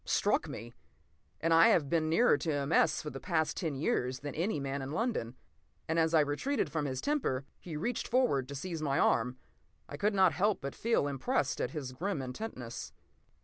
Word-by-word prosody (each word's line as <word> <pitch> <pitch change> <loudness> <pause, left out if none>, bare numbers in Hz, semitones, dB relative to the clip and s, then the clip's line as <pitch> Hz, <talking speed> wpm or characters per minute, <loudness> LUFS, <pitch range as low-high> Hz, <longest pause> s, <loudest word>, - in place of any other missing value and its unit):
Struck - - +1
me! 115 +2 -8 0.7
And 165 +1 +2
I 165 +1 +7
have 150 -5 +3
been 155 +1 +1
nearer 230 +7 +5
to 155 +2 -2
M. 145 0 -1
S. - - +3
for 150 - -5
the 135 - -7
past 160 -3 0
ten 160 -5 -2
years 130 -2 -1
than 145 -1 -5
any 170 0 -1
man 140 0 -3
in 135 - -5
London. 190 - -1 0.5
And 160 +1 +1
as 160 0 +3
I 155 - +7
retreated 150 - -1
from 150 -2 -1
his 130 -2 -3
temper, 255 - 0
he 160 -4 -6
reached 240 +11 -2
forward 240 - +2
to 140 - -7
seize 165 +3 -4
my 140 -2 0
arm. 125 +2 +2 0.5
I - - -7
could 205 0 +1
not 190 -3 +5
help 205 +1 +1
but 140 0 -5
feel 230 -9 +1
impressed 135 0 -1
at - - 0
his 135 -2 -5
grim 170 +6 -2
intentness. 125 - -6
150 Hz, 200 wpm, -32 LUFS, 135-180 Hz, 0.7 s, I